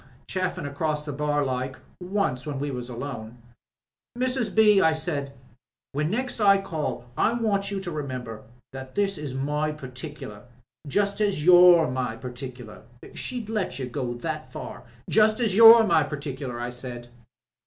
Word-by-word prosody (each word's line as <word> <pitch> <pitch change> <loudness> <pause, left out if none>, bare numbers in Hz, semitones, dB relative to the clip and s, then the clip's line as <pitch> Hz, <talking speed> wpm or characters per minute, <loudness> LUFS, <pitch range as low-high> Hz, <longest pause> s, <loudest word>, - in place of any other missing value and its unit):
Chaffin 185 -5 -2
across 150 +1 -2
the 145 - -4
bar 145 0 0
like, 130 0 -3 0.2
once 180 -9 -1
when 145 -2 -3
we 145 +1 -3
were 125 - -4
alone, 120 -2 -7 0.8
*Mrs. 255 -2 -1
B.,' 210 -3 +6
I 160 - +4
said, 155 -3 -3 0.6
'when 150 +2 -1
next 245 +5 -2
I 200 -1 +6
call 155 -10 -4
I 230 - +2
want 210 -4 0
you 200 -1 -3
to 180 -2 -5
remember 130 -7 -5 0.3
that 130 -1 -9
this 200 -4 0
is 145 -4 -5
my 150 +3 -1
particular 130 -5 -9 0.3
— - - -21
just 200 0 +1
as 195 -8 0
you're 175 -2 +8
my 125 -2 -2
particular? 125 -2 -9 0.2
' - - -13
(She'd 245 -4 -5
let 205 - -2
you 135 - -3
go 125 -1 -4
that 155 +4 -5
far!) - - -8 0.2
'Just 215 +1 +3
as 220 -5 +1
you're 225 +1 +10
my 170 -7 +4
par 150 0 -3
ticular,' 135 -4 -6
I 120 0 -3
said. 120 -1 -8
150 Hz, 165 wpm, -25 LUFS, 130-195 Hz, 0.8 s, you're